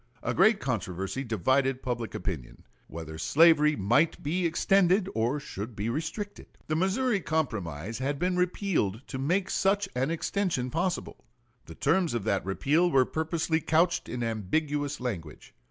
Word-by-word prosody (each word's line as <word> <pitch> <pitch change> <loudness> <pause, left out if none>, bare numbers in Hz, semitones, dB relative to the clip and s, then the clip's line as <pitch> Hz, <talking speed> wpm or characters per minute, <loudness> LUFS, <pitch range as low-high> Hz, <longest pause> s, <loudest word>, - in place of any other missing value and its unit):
A - - -1
great 215 -2 +4
controversy 95 -1 -3
divided 130 +4 +1
public 120 -3 -3
opinion, 80 -12 -5 0.2
whether 80 -1 -8
slavery 150 - +5
might 120 +11 +2
be 170 +4 0
extended 185 +3 +3
or 120 +6 0
should 110 -5 -7
be 105 +3 -2
restricted. 165 - -4 0.2
The 155 - -1
Missouri 200 +6 +1
Compromise 110 - -2
had 140 +2 -1
been 180 +4 0
repealed 180 - 0
to 130 - -4
make 180 +8 0
such 200 +1 +2
an 130 +3 0
extension 165 -6 -1
possible. 175 +3 -2 0.4
The 80 - -10
terms 165 -1 +1
of 115 - -2
that 100 -2 0
repeal 145 - +2
were 135 -5 +4
purposely 160 +1 -1
couched 170 +3 +1
in 120 -1 -3
ambiguous 145 +7 -1
language. 95 -12 -6
145 Hz, 145 wpm, -28 LUFS, 115-170 Hz, 0.4 s, slavery